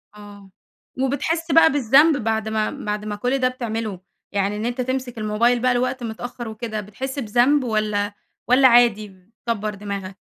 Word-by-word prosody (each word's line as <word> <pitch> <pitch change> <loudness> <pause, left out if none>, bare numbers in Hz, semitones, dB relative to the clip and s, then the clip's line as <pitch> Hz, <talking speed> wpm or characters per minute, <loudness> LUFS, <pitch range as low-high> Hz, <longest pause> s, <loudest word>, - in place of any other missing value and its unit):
آه، 205 -2 -13 0.5
وبتحس 325 +5 -1
بقى 325 -2 +6
بالذنب 285 +3 +4
بعد 220 -1 -1
ما 215 -1 0
بعد 210 0 -4
ما 210 -1 -3
كل 250 +6 0
ده 255 -1 +2
بتعمله، 225 -6 -4 0.3
يعني 200 0 -1
إن 220 - -3
أنت 245 +1 -2
تمسك 255 -1 -3
الموبايل 225 +3 +1
بقى 255 +1 +2
لوقت 255 +1 -1
متأخر 240 +1 -6
وكده، 220 -1 -5
بتحس 265 +7 -6
بذنب 250 +5 +2
والَّا 210 -3 -1 0.3
والَّا 260 +2 +6
عادي، 235 -3 +4
بتكَبَّر 210 +2 -5
دماغك؟ 200 -1 -6
225 Hz, 155 wpm, -22 LUFS, 210-255 Hz, 0.5 s, بقى